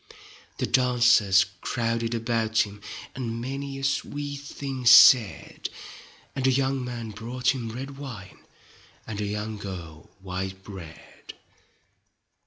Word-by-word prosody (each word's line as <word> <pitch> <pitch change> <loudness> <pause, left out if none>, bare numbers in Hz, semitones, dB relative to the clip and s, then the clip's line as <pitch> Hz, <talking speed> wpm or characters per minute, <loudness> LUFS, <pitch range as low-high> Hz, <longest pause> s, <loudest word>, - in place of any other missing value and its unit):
The - - 0
dancers 120 -6 +4 0.2
crowded 115 -1 -1
about 115 -1 +1
him, 105 0 -12 0.3
And 115 -3 -4
many 135 +2 -5
a 135 - -7
sweet 145 +1 -2
thing 140 -2 -6
said, 115 -2 +6 0.7
And 130 -1 +1
a - - +5
young 135 0 +1
man 120 -3 -5
brought 125 +5 -1
him 120 -4 -5
red 135 +4 -7
wine 115 -9 -9 0.7
And 105 -2 -5
a - - -1
young 105 +1 -4
girl 85 -6 -8
white 95 0 -5
bread. 85 -6 -11
115 Hz, 120 wpm, -26 LUFS, 105-130 Hz, 0.7 s, said